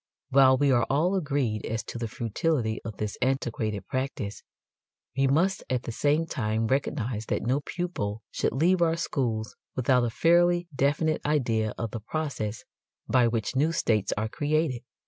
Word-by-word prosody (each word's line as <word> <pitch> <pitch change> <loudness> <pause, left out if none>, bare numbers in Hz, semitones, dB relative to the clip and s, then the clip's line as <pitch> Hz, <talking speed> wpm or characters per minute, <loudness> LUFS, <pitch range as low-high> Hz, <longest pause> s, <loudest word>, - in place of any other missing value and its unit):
While 130 -1 +6
we 140 0 +3
are 120 -2 +3
all 160 +7 +2
agreed 140 - 0
as 115 -1 -2
to 120 - -7
the 115 - -2
futility 115 +1 -1
of 110 -3 -7
this 105 -1 -4
antiquated 115 -5 -1
practice 130 -6 -3 0.7
we 135 0 +3
must 170 +8 +2
at 125 -2 0
the - - -4
same 150 +7 +1
time 110 -6 -1
recognize 125 -3 -1
that - - -1
no 130 +6 +1
pupil 115 - -3
should - - 0
leave 175 +7 +3
our 165 -1 +3
schools 120 -9 -2 0.2
without 125 0 +3
a 120 - +1
fairly 175 +6 +3
definite 150 +3 +1
idea 115 -7 0
of 115 -1 -3
the 115 - -4
process 115 -4 -3 0.4
by 120 +1 +4
which 115 +1 -2
new 150 +5 +3
states 110 - +1
are 110 +1 0
created. 145 0 0
130 Hz, 165 wpm, -27 LUFS, 110-150 Hz, 0.7 s, While